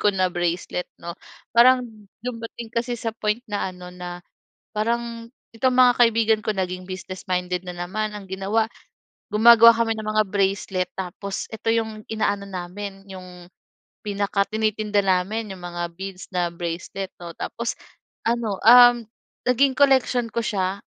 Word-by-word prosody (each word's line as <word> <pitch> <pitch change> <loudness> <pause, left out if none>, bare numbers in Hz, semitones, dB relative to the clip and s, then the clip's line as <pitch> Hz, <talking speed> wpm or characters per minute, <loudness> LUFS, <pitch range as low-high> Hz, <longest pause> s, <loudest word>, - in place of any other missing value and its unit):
ko 210 - +5
na 190 -2 +1
bracelet 175 0 -2
'no. 170 0 -7 0.4
Parang 250 +1 +6 0.4
dumating 230 -1 -6
kasi 240 +1 -1
sa 225 -1 -3
point 215 +1 -1
na 205 -2 -2
ano, 180 0 -11
na 175 -1 -7 0.6
parang 230 +1 -2 0.3
itong 255 +2 +2
mga 250 -1 +6
kaibigan 225 -2 +4
ko 215 - +1
naging 185 -1 -3
business 185 0 -7
minded 180 -1 -2
na 180 - -5
naman 200 +5 -3
ang 200 -2 -9
ginawa. 200 +4 0 0.6
Gumagawa 230 +1 +8
kami 225 0 +1
ng 215 - -5
mga 215 0 +3
bracelet 195 -2 0
tapos 190 +1 -5
eto 220 +1 -3
'yong 220 -2 -2
inaano 205 -2 0
namin 195 +1 -6
'yong 180 -2 -11 0.6
pinakatinitinda 210 +1 0
namin 195 +3 0
'yong 180 - -13
mga 175 0 -5
beads 190 0 -7
na 175 -1 +1
bracelet 175 +3 -5
'no 170 -1 -7
tapos 235 0 -3 0.5
ano, 225 -4 -1
um, 245 +1 +8 0.5
naging 265 +2 +4
collection 260 -3 +3
ko 235 +1 -2
siya, 195 -1 -2
205 Hz, 145 wpm, -23 LUFS, 185-230 Hz, 0.6 s, Gumagawa